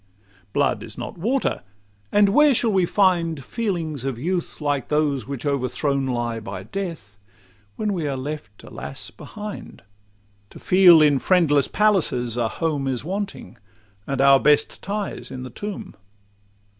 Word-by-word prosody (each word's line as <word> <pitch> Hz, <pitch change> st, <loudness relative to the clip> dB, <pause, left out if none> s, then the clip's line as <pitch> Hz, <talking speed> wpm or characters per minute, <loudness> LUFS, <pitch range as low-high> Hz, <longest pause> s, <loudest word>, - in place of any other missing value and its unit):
Blood -, -, +1 dB
is -, -, -10 dB
not -, -, -6 dB
water; 250 Hz, +9 st, 0 dB, 0.5 s
and 205 Hz, -1 st, +5 dB
where 295 Hz, +5 st, +5 dB
shall 230 Hz, -1 st, +2 dB
we 185 Hz, -2 st, +3 dB
find 170 Hz, -8 st, +1 dB
Feelings 170 Hz, -, -3 dB
of 135 Hz, -3 st, -3 dB
youth 175 Hz, +6 st, -3 dB
like 145 Hz, -3 st, -1 dB
those 145 Hz, -6 st, 0 dB
which 140 Hz, 0 st, -6 dB
overthrown 140 Hz, 0 st, 0 dB
lie 120 Hz, -2 st, -2 dB
By 110 Hz, -, -7 dB
death, 165 Hz, -, -6 dB, 0.6 s
when 210 Hz, -1 st, -1 dB
we 165 Hz, -5 st, -2 dB
are 135 Hz, -2 st, -2 dB
left, 130 Hz, -7 st, -7 dB
alas! 70 Hz, +2 st, -8 dB
behind, 210 Hz, -1 st, -9 dB, 0.7 s
To -, -, -13 dB
feel, 180 Hz, -4 st, +6 dB
in 145 Hz, -3 st, +4 dB
friendless 150 Hz, -4 st, +3 dB
palaces, 160 Hz, -, +1 dB
a 120 Hz, -2 st, +1 dB
home 145 Hz, +1 st, -2 dB
Is 130 Hz, -2 st, -2 dB
wanting, 195 Hz, -, -5 dB, 0.5 s
and 135 Hz, -1 st, -1 dB
our 135 Hz, 0 st, +7 dB
best 150 Hz, +1 st, +2 dB
ties 205 Hz, +1 st, -4 dB
in 130 Hz, -, -7 dB
the 130 Hz, -, -8 dB
tomb? 205 Hz, -, -6 dB
150 Hz, 145 wpm, -23 LUFS, 135-195 Hz, 0.7 s, our